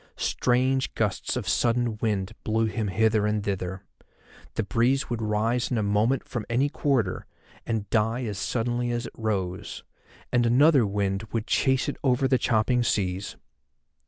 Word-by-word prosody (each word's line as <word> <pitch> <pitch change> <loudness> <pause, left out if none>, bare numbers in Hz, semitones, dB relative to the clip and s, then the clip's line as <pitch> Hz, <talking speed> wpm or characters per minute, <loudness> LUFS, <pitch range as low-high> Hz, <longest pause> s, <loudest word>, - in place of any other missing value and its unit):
Strange 130 +2 +1
gusts 105 -4 -1
of - - -3
sudden 120 -1 +1
wind 100 -4 -1
blew 110 +1 +1
him 110 -1 -2
hither 110 +2 +2
and 105 -1 0
thither. 95 -1 -3 0.7
The 110 - 0
breeze 120 +6 +1
would 115 -1 -2
rise 110 +3 0
in 125 - 0
a 110 - +1
moment 105 +6 +1
from 120 - -4
any 130 +5 +2
quarter, 135 - 0 0.4
and 110 -3 -2
die 115 +3 +1
as 105 -4 -4
suddenly 120 +2 -1
as 120 0 -2
it - - -8
rose, 95 -5 -3 0.5
and 120 -1 +3
another 135 0 +5
wind 100 0 -1
would 115 -1 -2
chase 130 -1 +1
it 145 - -3
over 130 0 +2
the 130 -1 +2
chopping 120 +2 +2
seas. 95 -4 -1
115 Hz, 160 wpm, -26 LUFS, 105-125 Hz, 0.7 s, another